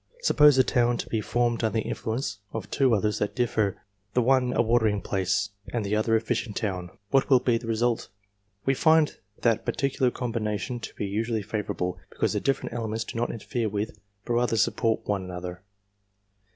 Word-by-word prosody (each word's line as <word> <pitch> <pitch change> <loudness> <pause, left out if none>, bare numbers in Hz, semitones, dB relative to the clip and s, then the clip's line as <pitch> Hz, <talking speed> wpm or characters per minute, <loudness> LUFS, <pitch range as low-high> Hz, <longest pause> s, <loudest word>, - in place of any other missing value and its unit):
Suppose 150 - +6
a 130 - +7
town 120 -1 +2
to - - -4
be 110 - 0
formed 120 +1 0
under 110 0 0
the - - -1
influence 110 -2 -3
of 110 -3 -5
two 130 -4 +3
others 105 0 0
that 105 - -1
differ, 115 -5 +1 0.4
the 125 - +4
one 130 0 +3
a - - -1
watering 110 -3 +2
place 95 -1 0 0.2
and 115 -4 -1
the 100 +2 0
other 110 +1 +2
a - - +4
fishing 115 -2 -2
town; 90 -5 -2 0.2
what 135 - +3
will 130 -2 +7
be 120 -2 +1
the 115 - -9
result? 115 +1 0 0.6
We 135 - +3
find 160 +2 +4 0.3
that 115 -3 +3
particular 135 -2 +1
combination 115 -1 -3
to - - -8
be - - -3
usually 110 +2 -1
favourable, 100 -4 -3
because - - -1
the - - +1
different 135 -1 -1
elements 115 -1 -2
do - - -9
not 120 +1 0
interfere 115 0 -2
with 105 0 -3 0.3
but 120 - -1
rather 120 -1 +2
support 110 +1 +1
one 100 -2 0
another. 90 0 -6
115 Hz, 190 wpm, -27 LUFS, 105-120 Hz, 0.6 s, a